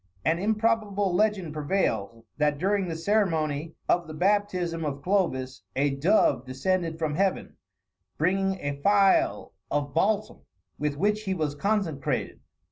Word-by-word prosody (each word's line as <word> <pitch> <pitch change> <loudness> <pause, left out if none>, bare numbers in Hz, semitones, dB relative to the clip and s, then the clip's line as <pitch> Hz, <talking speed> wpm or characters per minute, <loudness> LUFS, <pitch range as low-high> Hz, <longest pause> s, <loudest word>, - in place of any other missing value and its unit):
An 165 +1 +2
improbable 210 -2 +1
legend 195 -5 +1
prevails, 115 - -1
that 150 -1 +2
during 195 +3 0
the 165 - -3
ceremony 165 -5 0
of 175 -1 +2
the 155 - -8
baptism 180 -2 0
of 140 -2 -4
Clovis, 135 - 0
a 140 +1 +2
dove 140 - +2
descended 165 +5 -1
from 155 -2 -1
Heaven, 190 +4 -1 0.6
bringing 190 +3 +1
a 145 0 -4
phial 195 - +3 0.2
of 145 -1 -1
balsam, 210 +5 0 0.4
with 150 -1 -1
which 210 +5 0
he 190 -1 -1
was 155 -4 -1
consecrated. 170 -5 -1
170 Hz, 130 wpm, -27 LUFS, 145-200 Hz, 0.6 s, phial